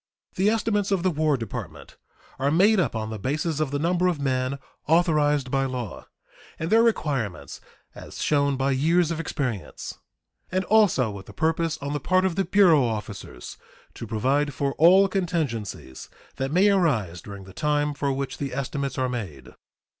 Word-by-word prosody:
The 195 Hz, +3 st, +2 dB
estimates 210 Hz, -2 st, 0 dB
of 195 Hz, -3 st, 0 dB
the 185 Hz, -, +2 dB
War 155 Hz, -2 st, +1 dB
Department 115 Hz, -4 st, -7 dB, 0.4 s
are 135 Hz, +2 st, +1 dB
made 195 Hz, +7 st, +4 dB
up 175 Hz, -, 0 dB
on 110 Hz, 0 st, -3 dB
the 110 Hz, -, -5 dB
basis 150 Hz, -, -2 dB
of 155 Hz, -3 st, 0 dB
the 145 Hz, -, -2 dB
number 175 Hz, +4 st, +1 dB
of 175 Hz, -5 st, 0 dB
men 130 Hz, 0 st, -1 dB, 0.3 s
authorized 150 Hz, -5 st, +2 dB
by 135 Hz, 0 st, +1 dB
law, 125 Hz, -5 st, -5 dB, 0.5 s
and 160 Hz, +4 st, -4 dB
their 225 Hz, +1 st, +6 dB
requirements 140 Hz, -, -1 dB, 0.3 s
as -, -, -10 dB
shown 140 Hz, -2 st, +1 dB
by 135 Hz, +1 st, +1 dB
years 165 Hz, +5 st, +2 dB
of 165 Hz, -, -3 dB
experience, 125 Hz, -, -4 dB, 0.5 s
and 185 Hz, +1 st, 0 dB
also 195 Hz, -, +3 dB
with 100 Hz, -1 st, -9 dB
the -, -, -11 dB
purpose 160 Hz, 0 st, 0 dB
on 140 Hz, +1 st, -3 dB
the 145 Hz, -, -1 dB
part 185 Hz, +6 st, +2 dB
of 185 Hz, -3 st, 0 dB
the 195 Hz, -, +1 dB
bureau 175 Hz, -6 st, +5 dB
officers 105 Hz, -, -5 dB, 0.4 s
to 115 Hz, -, -8 dB
provide 135 Hz, +6 st, 0 dB
for 140 Hz, +1 st, -1 dB
all 185 Hz, +5 st, +7 dB
contingencies 155 Hz, -, -3 dB, 0.3 s
that 135 Hz, +1 st, -2 dB
may 190 Hz, +5 st, +4 dB
arise 110 Hz, -, +1 dB
during 100 Hz, -1 st, -9 dB
the 95 Hz, 0 st, -13 dB
time 150 Hz, +3 st, 0 dB
for 140 Hz, -1 st, -1 dB
which 135 Hz, 0 st, -4 dB
the 140 Hz, -1 st, -4 dB
estimates 140 Hz, 0 st, -3 dB
are 130 Hz, -1 st, +1 dB
made. 90 Hz, -, -6 dB
145 Hz, 175 wpm, -25 LUFS, 130-175 Hz, 0.5 s, all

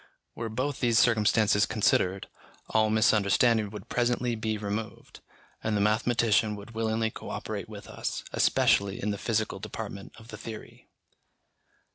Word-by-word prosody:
Were 115 Hz, -1 st, -5 dB
both 130 Hz, +5 st, -2 dB
these 120 Hz, -2 st, +2 dB
circumstances 110 Hz, -2 st, +3 dB
considered, 95 Hz, -3 st, +1 dB, 0.4 s
all 110 Hz, -1 st, +3 dB
misunderstanding 110 Hz, 0 st, +3 dB
would 105 Hz, -1 st, -9 dB
presently 120 Hz, 0 st, 0 dB
be 110 Hz, -1 st, -2 dB
removed, 105 Hz, +1 st, -5 dB, 0.4 s
and 110 Hz, -1 st, 0 dB
the -, -, +1 dB
mathematician 110 Hz, 0 st, +2 dB
would 105 Hz, +3 st, -10 dB
willingly 110 Hz, 0 st, -1 dB
co -, -, -9 dB
operate -, -, -5 dB
with -, -, -10 dB
us, -, -, -4 dB
especially 100 Hz, -1 st, +2 dB
in 105 Hz, -, -1 dB
the 100 Hz, -, -4 dB
physical 110 Hz, -2 st, -1 dB
department 100 Hz, -1 st, -7 dB
of 110 Hz, 0 st, -15 dB
the -, -, -8 dB
theory. 110 Hz, -2 st, -10 dB
110 Hz, 140 wpm, -28 LUFS, 105-115 Hz, 0.4 s, circumstances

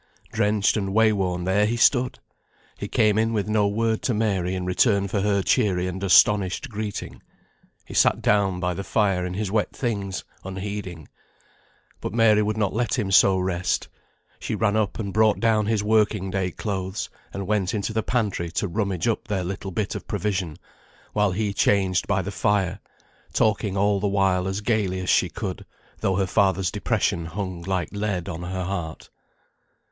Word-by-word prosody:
Drenched 105 Hz, 0 st, +2 dB
and 100 Hz, -1 st, -2 dB
way 110 Hz, -1 st, +5 dB
worn, 90 Hz, -3 st, -1 dB
there 100 Hz, +3 st, +2 dB
he 120 Hz, +2 st, -1 dB
stood! 125 Hz, +1 st, +3 dB, 0.6 s
He -, -, -6 dB
came 110 Hz, -1 st, +2 dB
in 115 Hz, +1 st, +1 dB
with 105 Hz, -2 st, -1 dB
no 105 Hz, -1 st, +2 dB
word 110 Hz, +2 st, 0 dB
to 120 Hz, -, 0 dB
Mary 95 Hz, -4 st, 0 dB
in 90 Hz, -1 st, -3 dB
return 100 Hz, +2 st, +2 dB
for 100 Hz, +1 st, -1 dB
her 100 Hz, -1 st, +1 dB
cheery 95 Hz, -8 st, +2 dB
and 90 Hz, +1 st, -4 dB
astonished 100 Hz, +5 st, +4 dB
greeting. 105 Hz, -2 st, -5 dB, 0.6 s
He -, -, -10 dB
sat -, -, +4 dB
down 100 Hz, -3 st, +2 dB
by 90 Hz, 0 st, -1 dB
the 100 Hz, -, -5 dB
fire 95 Hz, -1 st, +1 dB
in 90 Hz, 0 st, -4 dB
his 100 Hz, -1 st, -2 dB
wet 105 Hz, -1 st, 0 dB
things, 100 Hz, -6 st, -3 dB, 0.2 s
unheeding. 95 Hz, -4 st, -6 dB, 0.9 s
But -, -, -5 dB
Mary 110 Hz, -2 st, +5 dB
would 105 Hz, +1 st, -1 dB
not 100 Hz, -3 st, 0 dB
let 120 Hz, +3 st, 0 dB
him 100 Hz, -5 st, -1 dB
so 95 Hz, 0 st, +6 dB
rest. 90 Hz, -1 st, -1 dB, 0.5 s
She -, -, -3 dB
ran 105 Hz, -1 st, +1 dB
up 110 Hz, -2 st, 0 dB
and 100 Hz, -4 st, -4 dB
brought 110 Hz, -1 st, +3 dB
down 110 Hz, -2 st, +2 dB
his 110 Hz, -2 st, +1 dB
working 105 Hz, -3 st, +1 dB
day 95 Hz, -1 st, -1 dB
clothes, 95 Hz, 0 st, -4 dB, 0.2 s
and 100 Hz, 0 st, -5 dB
went 100 Hz, -1 st, 0 dB
into 105 Hz, +1 st, -2 dB
the 110 Hz, -, +1 dB
pantry 105 Hz, -7 st, -1 dB
to 100 Hz, -, -1 dB
rummage 100 Hz, +1 st, -1 dB
up 115 Hz, -, -1 dB
their 100 Hz, -4 st, -1 dB
little 95 Hz, +2 st, -5 dB
bit 100 Hz, +2 st, -2 dB
of -, -, -7 dB
provision 95 Hz, -6 st, -2 dB, 0.6 s
while 105 Hz, -2 st, +2 dB
he 100 Hz, +2 st, -1 dB
changed 95 Hz, -3 st, +2 dB
by 95 Hz, -, +1 dB
the 100 Hz, -, -4 dB
fire, 100 Hz, -1 st, 0 dB, 0.5 s
talking 105 Hz, -2 st, +1 dB
all 100 Hz, 0 st, +2 dB
the 100 Hz, -, 0 dB
while 95 Hz, -2 st, +1 dB
as 95 Hz, +2 st, -2 dB
gaily 105 Hz, -4 st, 0 dB
as 95 Hz, -, 0 dB
she -, -, +3 dB
could, -, -, -5 dB, 0.4 s
though 95 Hz, -, 0 dB
her 95 Hz, +1 st, +1 dB
father's 95 Hz, -2 st, +1 dB
depression 85 Hz, -1 st, 0 dB
hung 90 Hz, 0 st, -5 dB
like 95 Hz, 0 st, -2 dB
lead 100 Hz, -3 st, -2 dB
on 85 Hz, -3 st, -5 dB
her 90 Hz, +1 st, -4 dB
heart. 85 Hz, -4 st, -5 dB
100 Hz, 180 wpm, -24 LUFS, 95-105 Hz, 0.9 s, so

